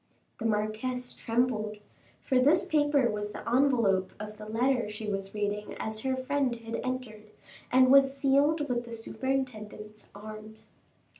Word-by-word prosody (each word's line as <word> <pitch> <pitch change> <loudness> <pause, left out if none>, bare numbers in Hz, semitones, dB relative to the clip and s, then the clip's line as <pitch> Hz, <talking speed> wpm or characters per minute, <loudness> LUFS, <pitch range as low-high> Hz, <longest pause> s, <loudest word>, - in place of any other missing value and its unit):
The 230 - -4
marquise 220 +4 -2
trembled, 225 -3 -1 0.5
for 260 -2 +2
this 310 +7 +5
paper 290 -6 +3
was 210 0 -4
the - - -8
envelope 230 -7 +2
of 210 0 -7
the 215 0 -9
letter 240 +1 +1
she 210 +1 -6
was 195 -1 -3
reading 210 0 -2
as 220 0 -3
her 265 +3 -1
friend 260 -1 0
had 230 0 -5
entered, 240 -5 -5 0.4
and 255 0 +6
was 275 0 +6
sealed 290 +3 +3
with 240 -2 -1
the 235 - -9
superintendent's 225 -3 -4
arms. 215 +1 -10
235 Hz, 145 wpm, -29 LUFS, 215-265 Hz, 0.5 s, and